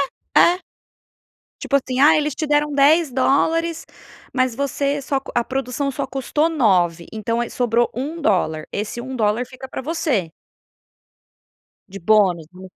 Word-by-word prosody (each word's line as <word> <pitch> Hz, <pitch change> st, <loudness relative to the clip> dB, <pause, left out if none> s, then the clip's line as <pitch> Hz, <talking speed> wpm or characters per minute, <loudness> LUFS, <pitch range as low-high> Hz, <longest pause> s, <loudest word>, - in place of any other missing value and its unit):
É, -, -, +1 dB
é. 350 Hz, +1 st, +5 dB, 1.0 s
Tipo 280 Hz, -, 0 dB
assim, 255 Hz, -1 st, -2 dB
ah, 305 Hz, +3 st, +7 dB
eles 300 Hz, -2 st, 0 dB
te 310 Hz, 0 st, -3 dB
deram 295 Hz, 0 st, +1 dB
$10, 315 Hz, +3 st, +2 dB, 0.5 s
mas 255 Hz, -2 st, +1 dB
você 280 Hz, +2 st, -1 dB
só 275 Hz, 0 st, -1 dB
co -, -, -11 dB
a 240 Hz, -, +2 dB
produção 270 Hz, +2 st, -2 dB
só 275 Hz, 0 st, -4 dB
custou 275 Hz, +4 st, 0 dB
9 180 Hz, -, +1 dB
então 230 Hz, +2 st, -2 dB
aí 240 Hz, -, -3 dB
sobrou 240 Hz, -1 st, +1 dB
$1, 215 Hz, -, -1 dB
esse 210 Hz, +3 st, -4 dB
$1 240 Hz, -2 st, -1 dB
fica 255 Hz, +1 st, -11 dB
pra -, -, -5 dB
você. 270 Hz, -, -1 dB, 1.6 s
De 195 Hz, +1 st, -9 dB
bônus 185 Hz, -4 st, +2 dB
vamos 185 Hz, 0 st, -12 dB
260 Hz, 140 wpm, -20 LUFS, 215-290 Hz, 1.6 s, ah